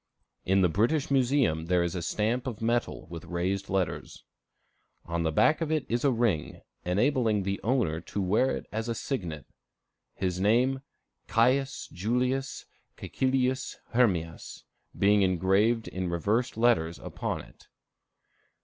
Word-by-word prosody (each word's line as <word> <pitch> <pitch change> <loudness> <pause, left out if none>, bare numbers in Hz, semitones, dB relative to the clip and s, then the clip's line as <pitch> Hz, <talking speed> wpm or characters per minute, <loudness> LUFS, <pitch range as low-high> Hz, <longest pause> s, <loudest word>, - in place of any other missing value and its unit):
In 95 +1 +3
the - - +6
British 120 - +1
Museum 125 - +2
there 90 -1 +3
is 85 -1 -2
a 90 - -3
stamp 110 +9 -1
of 115 -5 -4
metal 120 +1 -1
with 85 -2 -7
raised 95 +3 -2
letters. 95 -5 -2 0.8
On 85 0 -2
the 80 -1 0
back 155 - +3
of 160 -1 -1
it 155 -4 0
is 120 +1 -1
a 140 - +4
ring, 115 - 0 0.2
enabling 110 +2 +1
the 100 +1 -2
owner 110 -10 0
to 100 - -5
wear 100 +7 +2
it - - -9
as 110 +3 -3
a 115 - -1
signet; 90 - -4 0.7
his 90 -2 -2
name, 125 +6 +2 0.5
Caius 130 +4 +1
Julius 125 +8 -1 0.3
Cæcilius 130 0 -1 0.2
Hermias, 90 -10 0 0.3
being 100 +1 +4
engraved 95 +5 +2
in 90 -1 -3
reversed 105 +9 0
letters 85 -9 +2
upon - - -4
it. - - -18
105 Hz, 140 wpm, -28 LUFS, 90-125 Hz, 0.8 s, the